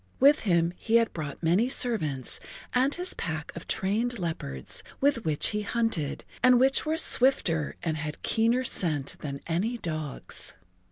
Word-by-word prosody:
With 285 +3 +6
him 170 -4 +1
he 230 - 0
had 230 -1 +3
brought 150 -1 -6
many 185 +10 +3
servants 155 - 0 0.3
and 260 +3 +3
his 360 +1 -3
pack 160 -1 -5
of 170 - -8
trained 225 +6 0
leopards, 160 - -2 0.2
with 275 -5 +1
which 155 -2 +1
he 210 0 -2
hunted, 210 -9 -1 0.2
and 250 -1 +6
which 270 +4 +3
were 315 +1 +1
swifter 240 - +3
and 160 -2 -1
had 150 0 -6
keener 230 +3 +2
scent 155 - 0
than 140 -2 -6
any 195 +9 -1
dogs. 155 -7 -5
190 Hz, 155 wpm, -28 LUFS, 155-245 Hz, 0.3 s, With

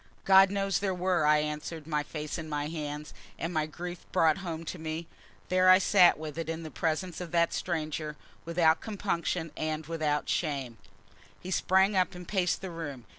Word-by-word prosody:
"God 190 0 +7
knows 195 0 0
there 195 -2 -1
were," 180 -3 +1
I 150 0 +6
answered, 150 +1 -5
my 150 -2 0
face 150 +1 -5
in 160 -1 -6
my 150 0 -2
hands; 150 -2 -5 0.2
and, 165 +2 -3
my 155 -2 0
grief 175 +2 -8
brought 160 +2 +3
home 165 -3 -5
to 175 - -6
me, 160 +1 -4 0.4
there 185 0 +4
I 185 - +9
sat 185 -1 +5
with 155 +1 -6
it 165 -1 -4
in 165 0 -4
the 155 - -7
presence 170 +2 -2
of 175 - -5
that 170 0 +3
stranger, 155 -3 -3 0.3
without 165 -1 +3
compunction 180 -6 -2
and 155 0 -3
without 155 -2 -1
shame. 135 - -2 0.6
He 185 - -7
sprang 190 +2 +3
up 185 -1 +1
and 180 0 -9
paced 185 -4 0
the 190 -2 -5
room. 145 -7 -6
165 Hz, 185 wpm, -29 LUFS, 155-180 Hz, 0.6 s, I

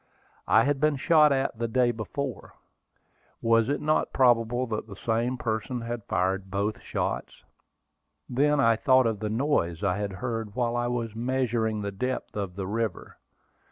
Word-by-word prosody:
I 110 - +5
had 140 +1 +1
been 155 0 +2
shot 150 +1 +5
at 135 -3 0
the 115 - 0
day 120 +1 +2
before. 120 +2 -5 0.8
Was 115 0 +3
it 145 - 0
not 155 +1 +1
probable 120 -1 +3
that 110 -2 -4
the 100 - -9
same 115 +5 -1
person 115 +2 -2
had 115 -2 -5
fired 95 +1 -1
both 100 +2 -2
shots? - - -4 0.8
Then 145 +3 +2
I 115 -4 +4
thought 130 +1 +4
of 110 -3 0
the 105 0 -2
noise 110 - 0
I 95 -1 +1
had 100 -1 -3
heard 115 0 -4
while 120 -1 0
I 120 0 0
was 115 -3 -3
measuring 115 -3 -1
the 100 - -3
depth 125 +6 -4
of 100 -4 -4
the 95 -1 -4
river. 110 -1 -3
115 Hz, 165 wpm, -27 LUFS, 105-130 Hz, 0.8 s, I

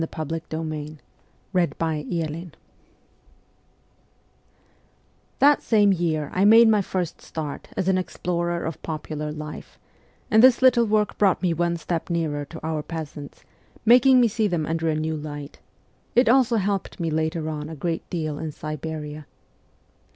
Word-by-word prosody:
THE 165 - -1
CORPS 155 -1 -6
OF 165 0 -5
PAGES 155 -1 -5 0.6
119 165 -2 -1
IV 170 +1 -8 2.9
THAT 290 +1 +5
same 205 -3 +4
year 160 -4 -1
I 185 - +2
made 225 +3 +8
my 215 -2 +4
first 180 -3 -3
start 150 -3 -6
as 185 - -1
an 190 -1 +3
explorer 175 -1 -2
of 160 - -5
popular 150 -1 -5
life, 150 0 -8 0.5
and 220 - +6
this 255 +1 +6
little 245 -2 +6
work 210 -1 0
brought 195 -2 +3
me 175 -2 +2
one 170 +1 0
step 170 0 -3
nearer 155 -4 -1
to 160 +3 -10
our 160 -1 -1
peasants, 150 -3 -8 0.4
making 250 +3 +7
me 240 - +5
see 215 0 0
them 170 -5 -1
under 165 0 -1
a 155 - +1
new 155 +1 -2
light; 145 -1 -7 0.6
it 245 +1 +5
also 250 0 +4
helped 200 -1 -2
me 165 -2 -1
later 160 +1 -1
on 150 -1 -4
a 160 - -7
great 165 +3 -3
deal 155 -4 -3
in 160 -1 -4
Siberia. 155 0 -6
165 Hz, 150 wpm, -24 LUFS, 155-195 Hz, 2.9 s, made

